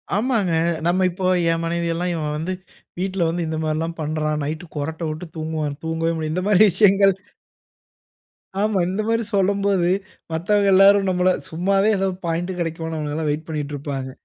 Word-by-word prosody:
ஆமாங்க. 215 -5 +1 0.3
நம்ம 185 +2 +2
இப்போ, 185 +1 -4 0.3
என் 165 0 -1
மனைவி 170 0 -1
எல்லாம் 175 +2 -1
"இவன் 155 -3 -2
வந்து, 165 +4 -3 0.5
வீட்ல 185 -2 0
வந்து 170 0 -2
இந்த 160 0 -3
மாதிரி 155 0 0
எல்லாம் 165 +1 -3
பண்ணுறான், 155 0 -1
நைட் 155 +4 -4
குறட்டை 160 +3 -3
விட்டு 155 +3 -6
தூங்குவான்" 155 -2 -3
தூங்கவே 165 +1 0
முடியாது, 155 -1 -3
இந்த 180 +2 -1
மாதிரி 210 -1 +6
விஷயங்கள் 195 +1 +5 1.5
ஆமா. 210 -2 +1
இந்த 195 +3 -1
மாதிரி 230 0 +1
சொல்லும்போது, 195 -2 +2 0.4
மத்தவங்க 200 +5 +1
எல்லாரும் 195 +1 +6
நம்மள 180 0 +2 0.2
சும்மாவே 195 +5 +2
ஏதோ 195 0 +1 0.2
பாயிண்ட் 170 +2 -1
கிடைக்குமான்னு 165 -1 -3
அவங்களலாம் 150 0 -2
வெயிட் 150 +2 -2
பண்ணிகிட்டுருப்பாங்க. 145 -3 -4
170 Hz, 155 wpm, -22 LUFS, 155-195 Hz, 1.5 s, மாதிரி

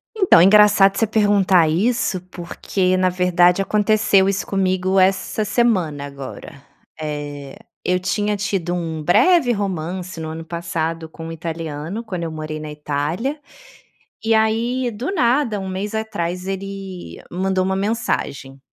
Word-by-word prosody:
Então, 380 - +5
engraçado 200 0 +6
você 225 - +2
perguntar 200 -5 +3
isso, 195 +2 0
porque 185 +1 -1
na 185 0 +3
verdade 180 0 +3
aconteceu 210 -1 +3
isso 195 0 -1
comigo 190 -1 +1
essa 190 +3 +1
semana 190 - +1
agora. 140 0 -9 0.4
Eh, 145 -2 -6 0.3
eu 180 0 +1
tinha 205 +3 -1
tido 195 -4 -2
um 165 -3 -3
breve 255 - +4
romance 185 -3 -3
no 160 - -5
ano 160 +1 -6
passado 165 -1 -3
com 165 +1 -9
um - - -6
italiano, 165 +4 -5
quando 185 -7 -5
eu 165 - -4
morei 155 0 -5
na 155 0 -7
Itália. 150 - -3 0.8
E 225 0 +2
aí, 235 +3 +1
do 240 - -4
nada, 245 - +1
um 190 - -5
mês 200 +3 -4
atrás 185 -5 -3
ele 195 -1 -6
mandou 185 +1 0
uma 190 +1 0
mensagem 190 - -2
185 Hz, 140 wpm, -20 LUFS, 165-210 Hz, 0.8 s, engraçado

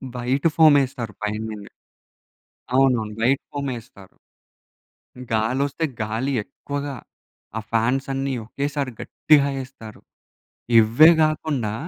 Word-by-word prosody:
White 130 +5 0
ఫోమేస్తారు 140 -7 +3
పైననే. 105 -1 -4 1.1
అవునవును 125 -5 +2
white 130 +4 +2
ఫోమేస్తారు. 120 -9 -7 1.2
గాలోస్తే 130 +8 0 0.2
గాలి 110 +6 -2
ఎక్కువగా, 140 +1 -6 0.6
ఆ - - -3
ఫాన్స్ 120 +4 +1
అన్నీ 135 0 -2
ఒకేసారి 140 0 -3
గట్టిగా 145 -2 +3
ఏస్తారు. 125 -5 -12 0.8
ఇవ్వే 120 +10 +6
కాకుండా 145 -8 -1
130 Hz, 85 wpm, -22 LUFS, 110-140 Hz, 1.2 s, ఇవ్వే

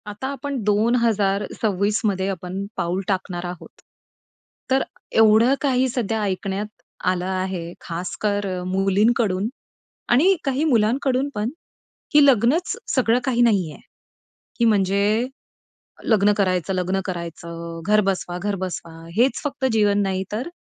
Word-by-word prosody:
आता 210 +5 -5
आपण 280 +1 -4
2026 210 -2 +1
मध्ये 190 -2 0
आपण 185 +1 -4
पाऊल 175 +3 -1
टाकणार 185 -2 -2
आहोत. 175 -1 -9 0.9
तर 265 +1 +3 0.4
एवढं 225 +3 +6
काही 260 -2 +2
सध्या 225 -3 -1
ऐकण्यात 195 +1 -2 0.4
आलं 180 -1 -1
आहे, 185 -2 -3
खासकर 200 +4 -2 0.2
मुलींकडून 195 +1 +2 0.6
आणि 335 +11 +5
काही 275 +1 0
मुलांकडून 260 +2 +2
पण, 210 +2 -1 0.6
की 295 -1 +6
लग्नच 270 - +3 0.2
सगळं 245 -2 +3
काही 245 -3 +1
नाहीये, 195 -9 +2 0.8
की 235 - +3
म्हणजे 205 +2 +2 0.8
लग्न 210 -2 +4
करायचं, 185 -1 0
लग्न 185 +1 0
करायचं. 170 -2 -6
घर 210 +1 +5
बसवा, 180 -2 -1
घर 205 0 -1
बसवा 180 -3 -5 0.2
हेच 250 +4 +3
फक्त 280 -1 -3
जीवन 205 -2 +3
नाही. 190 -1 -1
तर 235 +9 -3
205 Hz, 120 wpm, -22 LUFS, 185-235 Hz, 0.9 s, एवढं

